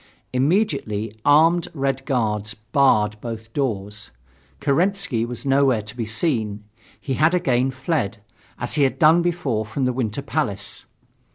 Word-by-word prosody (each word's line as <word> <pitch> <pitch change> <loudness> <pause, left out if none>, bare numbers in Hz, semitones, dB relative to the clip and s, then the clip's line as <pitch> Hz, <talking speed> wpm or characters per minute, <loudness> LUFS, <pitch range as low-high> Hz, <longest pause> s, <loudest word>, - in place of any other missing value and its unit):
Immediately 130 - 0
armed 165 +4 +4
Red 135 -1 -2
Guards 105 -4 -1
barred 105 -2 +2
both 115 -1 -7
doors. 105 -7 -3 0.5
Kerensky 170 - +1
was 120 +2 -7
nowhere 135 -5 +3
to 110 +2 -7
be 115 -3 -3
seen. 110 -3 -1 0.4
He 135 - -3
had 155 +6 +3
again 130 -6 +1
fled, 130 - -2 0.4
as - - -2
he 150 - +1
had 135 -2 +2
done 160 +1 +5
before 160 -11 -1
from 110 +5 -2
the 125 - +1
Winter 120 +1 -2
Palace. 115 -7 -3
130 Hz, 135 wpm, -22 LUFS, 110-145 Hz, 0.5 s, done